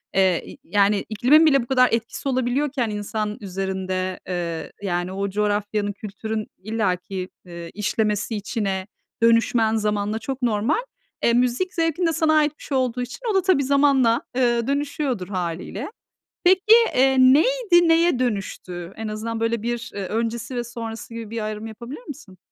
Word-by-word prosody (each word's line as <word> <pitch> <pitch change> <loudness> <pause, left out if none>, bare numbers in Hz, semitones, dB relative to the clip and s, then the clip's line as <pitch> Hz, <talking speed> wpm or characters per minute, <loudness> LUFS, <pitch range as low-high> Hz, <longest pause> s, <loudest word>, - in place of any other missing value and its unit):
Eee, 190 -3 +3
y - - -11
yani, 200 +2 +2
iklimin 255 +9 +5
bile 275 -4 +5
bu - - -11
kadar 255 -1 +4
etkisi 230 +4 -2
olabiliyorken 260 -1 0
insan 210 0 -3
üzerinde, 190 -1 -3
eee, 170 -3 -3
yani, 175 -2 -2
o 200 +1 -2
coğrafyanın, 205 0 0
kültürün 215 +1 -5
illaki, 190 -3 -2 0.2
eee, 170 -1 -8
işlemesi 210 +1 -1
içine, 200 -2 -2 0.4
dönüşmen 230 -1 +3
zamanla 210 0 -1
çok 265 +3 -5
normal. 235 - +1 0.4
E, 235 - +3
müzik 250 +10 +1
zevkin 330 +1 0
de 330 - +2
sana 320 -1 +2
ait 305 -1 +2
bir - - -12
şey 275 - -1
olduğu 250 -1 0
için 245 0 -6
o - - -1
da 385 - +4
tabii 370 -7 +3
zamanla, 275 -4 +3
eee, 240 -1 +2
dönüşüyordur 280 -7 -1
hâliyle. 185 - -4 0.5
Peki, 370 +1 +5 0.4
eee, 265 +1 +4
neydi, 345 - +5
neye 330 -3 +4
dönüştü? 190 -6 -3
En 220 0 -4
azından 225 +2 -4
böyle 230 -1 0
bir, 235 0 -3
eee, 200 - -4
öncesi 230 +3 -3
ve 240 - -1
sonrası 230 -1 -7
gibi 230 -2 -7
bir 225 -1 -3
ayrım 215 +1 -4
yapabilir 235 - -8
misin? 245 -11 -10
225 Hz, 155 wpm, -23 LUFS, 205-260 Hz, 0.5 s, iklimin